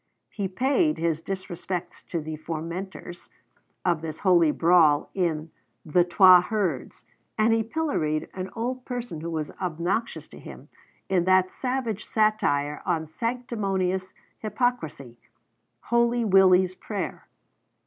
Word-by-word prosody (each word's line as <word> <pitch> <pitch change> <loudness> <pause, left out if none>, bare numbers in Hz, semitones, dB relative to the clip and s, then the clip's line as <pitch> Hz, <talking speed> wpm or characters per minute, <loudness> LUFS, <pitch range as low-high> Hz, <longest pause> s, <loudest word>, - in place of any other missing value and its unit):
He 200 -3 -3
paid 275 - +1
his 165 -1 -1
disrespects 180 -1 -5
to 170 - -3
the 155 +1 -5
fomenters 170 +3 -6 0.6
of 170 -3 +1
this 160 -1 -6
holy 175 -4 +5
brawl 160 -2 +4
in 165 -4 -1 0.3
'The 170 +3 +3
Twa 180 0 +7
Herds,' 180 - -3 0.3
and 220 +1 +4
he 225 - +2
pilloried 220 - -1
an 185 0 -5
old 250 +2 -3
person 245 -11 -5
who 170 - -4
was 155 -2 -3
obnoxious 180 +6 -2
to - - -13
him, - - -12 0.4
in 180 -2 +1
that 185 0 +4
savage 250 -5 -3
satire 195 -10 +1
on 165 -4 -1
sanctimonious 195 -3 -2 0.3
hypocrisy, 170 - -2 0.6
'Holy 235 0 +1
Willy's 185 -2 +5
Prayer.' 205 +2 -5
185 Hz, 120 wpm, -26 LUFS, 165-220 Hz, 0.6 s, Twa